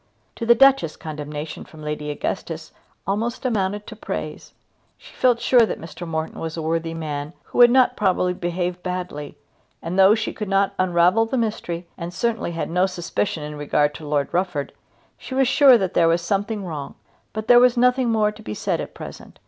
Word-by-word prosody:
To 230 Hz, -, -4 dB
the 235 Hz, -, +7 dB
Duchess 270 Hz, -, +4 dB
condemnation 150 Hz, 0 st, -6 dB
from 155 Hz, -1 st, -14 dB
Lady 150 Hz, 0 st, -4 dB
Augustus 145 Hz, -, -4 dB, 0.3 s
almost 225 Hz, +7 st, -2 dB
amounted 205 Hz, -3 st, -1 dB
to -, -, -9 dB
praise. -, -, -6 dB, 0.4 s
She -, -, -16 dB
felt 245 Hz, -2 st, +2 dB
sure 240 Hz, 0 st, +5 dB
that 220 Hz, -, -2 dB
Mr. 170 Hz, +1 st, -8 dB
Morton 160 Hz, -1 st, -4 dB
was 165 Hz, 0 st, -5 dB
a -, -, -2 dB
worthy 165 Hz, +1 st, -1 dB
man 150 Hz, -1 st, -4 dB
who -, -, -5 dB
would 240 Hz, 0 st, +9 dB
not 255 Hz, +1 st, +4 dB
probably 185 Hz, -3 st, +1 dB
behave 175 Hz, 0 st, -3 dB
badly, 180 Hz, -5 st, -5 dB, 0.4 s
and 175 Hz, +3 st, -3 dB
though 195 Hz, +3 st, +7 dB
she 220 Hz, -1 st, -3 dB
could 210 Hz, -3 st, -5 dB
not 195 Hz, 0 st, +2 dB
unravel 185 Hz, +4 st, +3 dB
the 260 Hz, -, -2 dB
mystery, 180 Hz, -7 st, -3 dB
and 170 Hz, 0 st, -5 dB
certainly 225 Hz, -4 st, -1 dB
had 165 Hz, -, -3 dB
no 180 Hz, +2 st, +3 dB
suspicion 175 Hz, -2 st, -3 dB
in 150 Hz, 0 st, -6 dB
regard 145 Hz, 0 st, +1 dB
to 150 Hz, 0 st, -9 dB
Lord 145 Hz, -1 st, -1 dB
Rufford, 175 Hz, -6 st, -1 dB, 0.5 s
she 260 Hz, -, -7 dB
was 265 Hz, -1 st, +3 dB
sure 270 Hz, -1 st, +7 dB
that 190 Hz, -4 st, -2 dB
there 165 Hz, -, +4 dB
was 170 Hz, +1 st, +2 dB
something 200 Hz, +3 st, -1 dB
wrong. 150 Hz, -5 st, -6 dB, 0.4 s
But 215 Hz, 0 st, -5 dB
there 240 Hz, 0 st, +8 dB
was 250 Hz, 0 st, +4 dB
nothing 250 Hz, 0 st, +3 dB
more 215 Hz, -2 st, +2 dB
to 210 Hz, -, -14 dB
be 105 Hz, -, -6 dB
said -, -, -1 dB
at -, -, -8 dB
present. -, -, -10 dB
180 Hz, 195 wpm, -22 LUFS, 165-225 Hz, 0.5 s, would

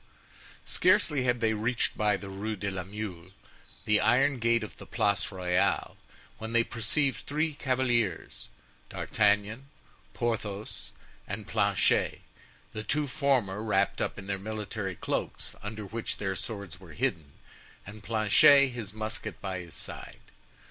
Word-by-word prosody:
Scarcely 140 Hz, -4 st, +3 dB
had 125 Hz, -1 st, +1 dB
they 110 Hz, -1 st, +3 dB
reached 115 Hz, +3 st, 0 dB
by 105 Hz, -2 st, +2 dB
the 100 Hz, -, -9 dB
Rue 105 Hz, +3 st, -3 dB
de 100 Hz, 0 st, -3 dB
la 95 Hz, -1 st, -3 dB
Mule 95 Hz, -3 st, -6 dB, 0.6 s
the 105 Hz, -1 st, +4 dB
iron 130 Hz, +4 st, +3 dB
gate 115 Hz, 0 st, +3 dB
of 105 Hz, -, -8 dB
the -, -, -11 dB
Place 100 Hz, 0 st, +1 dB
Royale, 90 Hz, -2 st, +1 dB, 0.4 s
when 110 Hz, +1 st, -5 dB
they 115 Hz, 0 st, +5 dB
perceived 120 Hz, +2 st, 0 dB
three 155 Hz, +2 st, 0 dB
cavaliers, 125 Hz, -, 0 dB, 0.4 s
D'Artagnan, 105 Hz, +5 st, +1 dB, 0.5 s
Porthos, 105 Hz, -, -3 dB, 0.4 s
and -, -, -5 dB
Planchet, -, -, +2 dB, 0.5 s
the 110 Hz, -, -3 dB
two 150 Hz, +6 st, 0 dB
former 130 Hz, -8 st, +1 dB
wrapped 100 Hz, -3 st, +1 dB
up -, -, -1 dB
in 100 Hz, -, -7 dB
their 100 Hz, -1 st, -2 dB
military 105 Hz, -2 st, -4 dB
cloaks -, -, -3 dB
under 105 Hz, 0 st, -5 dB
which 115 Hz, +4 st, -3 dB
their 95 Hz, -2 st, -2 dB
swords 100 Hz, -6 st, -6 dB
were 90 Hz, -5 st, -12 dB
hidden, 85 Hz, -, -1 dB, 0.5 s
and 105 Hz, +2 st, -10 dB
Planchet, 115 Hz, +6 st, +6 dB
his 115 Hz, -5 st, -6 dB
musket 110 Hz, 0 st, -4 dB
by 95 Hz, -2 st, -3 dB
his 85 Hz, -2 st, -9 dB
side. -, -, -6 dB
110 Hz, 140 wpm, -29 LUFS, 100-120 Hz, 0.6 s, Planchet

